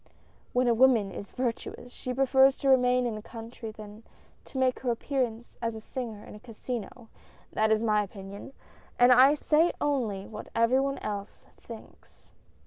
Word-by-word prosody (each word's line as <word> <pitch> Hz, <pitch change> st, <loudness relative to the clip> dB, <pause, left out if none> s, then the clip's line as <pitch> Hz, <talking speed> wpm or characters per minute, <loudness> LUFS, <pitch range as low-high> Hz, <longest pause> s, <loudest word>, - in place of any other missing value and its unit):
When 250 Hz, 0 st, +2 dB
a 235 Hz, -, +4 dB
woman 230 Hz, -5 st, +4 dB
is 200 Hz, -, -8 dB
virtuous, 245 Hz, 0 st, -4 dB
she 255 Hz, -, -6 dB
prefers 265 Hz, +1 st, +4 dB
to 275 Hz, -, 0 dB
remain 250 Hz, -1 st, +4 dB
in 235 Hz, -, -1 dB
the 215 Hz, -, -6 dB
country 225 Hz, +1 st, -9 dB
than 215 Hz, 0 st, -11 dB, 0.4 s
to -, -, -9 dB
make 260 Hz, -1 st, +1 dB
her 255 Hz, -, -2 dB
appearance 240 Hz, -1 st, -2 dB
as 230 Hz, -1 st, -2 dB
a -, -, -6 dB
singer 225 Hz, -2 st, -6 dB
in -, -, -11 dB
a 210 Hz, -, -11 dB
casino 235 Hz, 0 st, -7 dB, 0.2 s
— -, -, -29 dB
that 220 Hz, 0 st, +2 dB
is 220 Hz, +1 st, +2 dB
my 210 Hz, -2 st, +3 dB
opinion, 200 Hz, +4 st, -9 dB, 0.5 s
and 245 Hz, +1 st, +6 dB
I 260 Hz, +4 st, +7 dB
say 315 Hz, +3 st, +3 dB
only 230 Hz, -9 st, -1 dB
what 215 Hz, -, -9 dB
every 230 Hz, +3 st, +3 dB
one 275 Hz, 0 st, -1 dB
else 205 Hz, 0 st, -6 dB
thinks." 230 Hz, -2 st, -14 dB
235 Hz, 175 wpm, -28 LUFS, 215-260 Hz, 0.5 s, I